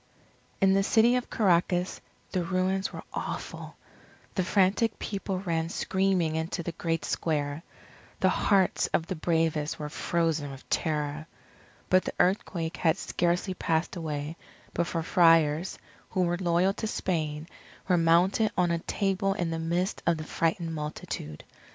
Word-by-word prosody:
In 195 0 +5
the 195 - +4
City 230 +4 +4
of 250 - -2
Caracas, 180 -2 +1 0.3
the 180 -2 0
ruins 185 +2 0
were - - -8
awful. - - -5 0.6
The 185 - 0
frantic 200 +4 +2
people 195 -2 -3
ran 165 -3 -1
screaming 190 -4 +1
into 165 +2 -2
the 170 - -3
great 165 0 -2
square. 145 -2 -1 0.6
The - - +4
hearts 195 -3 +2
of 165 - +1
the 185 - -4
bravest 160 -2 0
were 150 -1 -5
frozen 160 -2 0
with 135 -1 -11
terror. 150 -1 -1 0.6
But 185 0 +4
the - - -3
earthquake 175 -3 0
had 165 +1 +2
scarcely 180 +1 0
passed 165 -1 -1
away, 155 -1 -4 0.4
before 170 -1 -1
Friars, 165 -1 +4 0.3
who 185 - +1
were 175 0 +1
loyal 180 +1 +2
to 220 - -4
Spain, 155 -6 -2 0.4
were 185 - +4
mounted 175 +6 +3
on 175 -1 +3
a 170 - 0
table 195 +2 0
in 175 -4 -1
the 165 - -2
midst 170 +3 -1
of 170 -1 +3
the 155 - -5
frightened 165 +1 -1
multitude. 150 - -5
170 Hz, 145 wpm, -28 LUFS, 160-190 Hz, 0.6 s, In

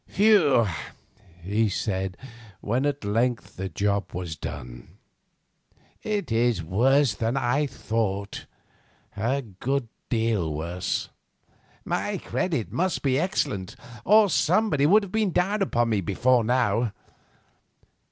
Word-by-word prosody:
"Phew!" 185 - +4 0.8
he 105 +4 +1
said, 95 -2 -2 0.4
when 125 +7 0
at 145 -6 -3
length 115 +4 -1
the 95 +1 -4
job 100 +3 -1
was 90 -3 -4
done. - - -8 1.0
"It 210 - -2
is 115 -5 +2
worse 125 - +3
than 115 +4 -1
I 135 +3 +1
thought, 105 -6 -3 0.7
a 125 +7 -1
good 120 +5 -3 0.2
deal 110 -9 0
worse. 85 +4 -3 0.8
My - - -1
credit 155 - -2
must 185 +2 -1
be 135 -1 +2
excellent, 130 - -2 0.3
or 210 +2 +6
somebody 170 -6 +2
would 210 +5 +5
have 195 - -8
been 220 -1 +1
down 200 +4 +1
upon 120 -11 +1
us 100 - +1
before 120 +7 +2
now. 115 -2 +1
120 Hz, 115 wpm, -25 LUFS, 100-145 Hz, 1.0 s, or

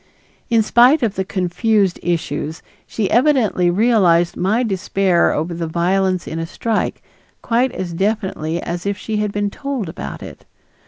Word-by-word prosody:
In 230 -2 +3
spite 250 +6 +5
of 220 -4 +1
the 190 - -2
confused 190 +1 0
issues, 160 -2 -3 0.2
she 210 -4 -2
evidently 240 -9 +3
realized 180 -4 +3
my 215 +7 +1
despair 190 -3 +1
over 160 +3 -2
the 165 -1 -3
violence 185 +2 0
in 160 - -4
a 165 - -3
strike 225 +5 -2 0.4
quite 245 +2 +1
as 175 -2 -5
definitely 190 -4 -1
as 175 +2 -4
if 200 0 -1
she 215 +1 -4
had 210 -1 -1
been 205 0 -2
told 275 -7 -4
about 165 +6 -7
it. - - -11
195 Hz, 155 wpm, -19 LUFS, 175-220 Hz, 0.4 s, spite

